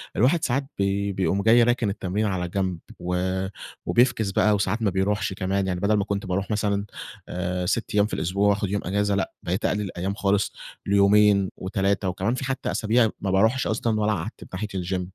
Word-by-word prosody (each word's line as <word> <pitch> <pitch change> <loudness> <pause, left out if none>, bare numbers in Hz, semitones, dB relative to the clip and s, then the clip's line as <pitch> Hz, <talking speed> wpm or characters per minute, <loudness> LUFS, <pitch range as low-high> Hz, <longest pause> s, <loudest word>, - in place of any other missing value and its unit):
الواحد 135 - +3
ساعات 135 +3 +1
بي 100 +1 0
بيقوم 95 +1 0
جاي 115 +3 +6
راكن 120 -2 +1
التمرين 100 +1 -2
على 95 -3 -1
جنب 95 -2 -2 0.2
و 90 +1 -2 0.7
و - - -1
بيفكس 120 -4 +3
بقى 105 +2 +3
وساعات 105 +3 -1
ما 110 - +2
بيروحش 100 +2 0
كمان. 95 +1 -1
يعني 90 -1 -1
بدل 100 +3 +2
ما 105 -1 +2
كنت 100 0 -3
باروح 95 +1 -2
مثلًا 105 -1 0 0.4
آآ 90 0 -2
6 115 +6 -1
أيّام 105 -1 +5
في 105 - -7
الأسبوع 100 +5 +1
وأخد 100 -1 0
يوم 100 0 -1
أجازة 100 +2 +1
لأ 100 - -2
بقيت 90 +3 -2
أقلل 105 - +1
الأيّام 95 -1 -3
خالص 100 -1 +1 0.3
ليومين 100 0 +4
و3 100 0 -1
وكمان 95 +6 -1
في 130 - -4
حتّى 130 0 -2
أسابيع 110 +1 +2
ما 95 - -1
باروحش 110 +7 +2
أصلًا 110 0 0
والّا 105 0 +2
أعتّب 95 +3 -6
ناحية 95 +4 -3
الGym 90 0 -2
100 Hz, 195 wpm, -24 LUFS, 95-110 Hz, 0.7 s, جاي